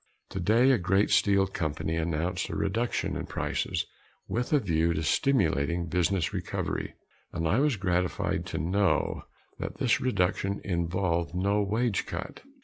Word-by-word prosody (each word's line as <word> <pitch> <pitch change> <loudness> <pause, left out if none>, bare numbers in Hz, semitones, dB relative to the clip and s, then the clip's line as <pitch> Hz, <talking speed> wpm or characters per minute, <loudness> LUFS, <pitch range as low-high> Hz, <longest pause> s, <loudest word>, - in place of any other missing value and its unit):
Today 110 +8 +3
a 125 - +3
great 95 +3 +2
steel 100 -1 +4
company 80 -3 -2
announced 85 +2 -1
a - - -4
reduction 115 +5 -1
in - - -4
prices - - -2 0.4
with 125 +1 -2
a 150 - +5
view 85 - +1
to 80 - -1
stimulating 85 - +1
business 90 +1 0
recovery, - - -3 0.4
and 80 -1 -2
I 100 +9 +3
was 145 -4 +2
gratified 90 -2 0
to - - -4
know 95 +5 +1 0.3
that - - -5
this - - +2
reduction 100 -3 0
involved 85 -2 -1
no 100 +3 +2
wage 110 +1 0
cut. 85 +2 -6
95 Hz, 140 wpm, -28 LUFS, 85-105 Hz, 0.4 s, a